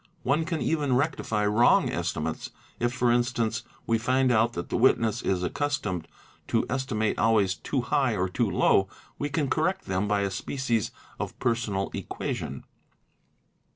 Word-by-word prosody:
One 150 +5 +1
can 165 -2 -2
even 145 -5 +1
rectify 125 -7 0
wrong 105 +4 +4
estimates, - - -3 0.3
if 120 0 +1
for 125 -1 +2
instance 120 -2 +1 0.2
we 115 -1 +2
find 130 +3 +2
out 115 0 +3
that 85 - -5
the - - -2
witness. 115 -2 +3
1s 90 -2 0
accustomed 125 - -2 0.4
to - - +1
estimate 115 -5 -1
always 105 -4 +3
too 110 - -2
high 130 -2 +1
or 95 -1 0
too 110 +4 0
low; 95 0 +3 0.3
we 145 - -1
can 145 0 0
correct 160 +7 0
them 95 +2 -1
by 105 -1 +1
a 100 -1 -1
species 120 -5 -1 0.3
of - - -4
personal 115 -5 -1
equation. - - -4
120 Hz, 155 wpm, -27 LUFS, 105-135 Hz, 0.4 s, wrong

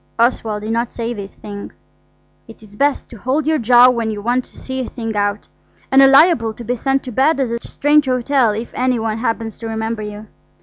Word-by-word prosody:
Oswald 225 -3 0
did 215 - -3
not 235 +1 -1
say 235 0 -4
these 200 -3 -8
things. 205 -1 -9 0.7
It 225 -1 -14
is 205 -1 -16
best 285 +5 0
to 235 - -10
hold 265 +7 -1
your 315 0 +1
jaw 245 +1 +6
when 230 -2 -2
you 215 -1 -4
want 245 +4 0
to - - -18
see 260 0 -5
a 255 - -3
thing 225 -3 -5
out, 205 0 -1 0.4
and 270 0 +6
are 270 - +8
liable 270 -6 +4
to 240 - -9
be 245 +2 -2
sent 270 +2 0
to 255 - -7
bed 275 +6 +2
at 255 -4 0
a 235 0 -5
strange 295 0 +2
hotel 255 -1 +2
if 220 +3 -4
any 255 0 0
one 225 -1 -2
happens 225 -2 -3
to 230 - -6
remember 220 0 -3
you. 210 0 -7
235 Hz, 225 wpm, -18 LUFS, 220-260 Hz, 0.7 s, are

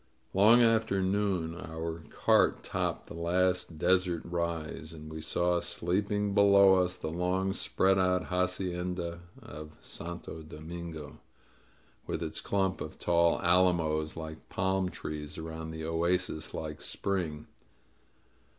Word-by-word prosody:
Long 110 +5 +7
after 110 -4 +3
noon 95 -4 0
our 80 -1 -5
cart - - +3
topped - - -2
the - - -10
last 90 0 0
desert 90 0 +2
rise, 85 -2 -3
and 80 0 -9
we 80 - -5
saw 85 +2 +1
sleeping 100 +4 0
below 100 -1 +7
us 90 0 -2
the 80 -3 -5
long 90 +3 0
spread 95 0 +2
out 90 -1 +2
ha 90 0 +1
cienda 90 -2 -3 0.2
of 75 0 -10
Santo 85 -1 -7
Domingo, 80 0 -8 0.9
with - - -2
its - - -4
clump 95 -2 0
of - - -6
tall 85 -1 +3
alamos 85 -4 +2
like 80 -1 -8
palm 95 0 0
trees 75 -3 -6
around 80 0 -6
the 80 0 -5
oasis 85 0 0
like 75 -1 -5
spring. 85 -7 -2
85 Hz, 125 wpm, -30 LUFS, 80-95 Hz, 0.9 s, Long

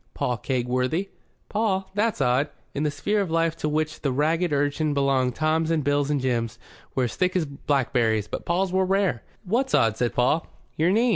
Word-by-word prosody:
"Paul 125 -2 -1
Kegworthy." 130 - -1 0.4
"Paul? 200 -3 -1
That's 210 -3 0
odd." 130 +3 +2 0.2
In 140 - -2
the 150 - +1
sphere 205 +9 0
of 195 - -2
life 165 0 +1
to 150 - -1
which 155 +1 -1
the 140 - 0
ragged 160 +5 +1
urchin 145 +1 0
belonged 135 -3 +2
Toms 160 +1 +1
and 160 -3 +1
Bills 145 0 +1
and 145 -1 +1
Jims 120 -3 -1 0.4
were 130 - +2
as 120 - -2
thick 185 0 +1
as 175 -3 +2
blackberries, 125 -6 0
but - - -5
Pauls 180 +2 0
were 190 0 +3
rare. 190 - +1 0.2
"What's 240 +7 +1
odd?" 110 -1 +3
said 120 0 -1
Paul. 130 +6 +2 0.3
"Your 160 +3 +2
name. 230 +6 +3
150 Hz, 195 wpm, -25 LUFS, 130-180 Hz, 0.4 s, were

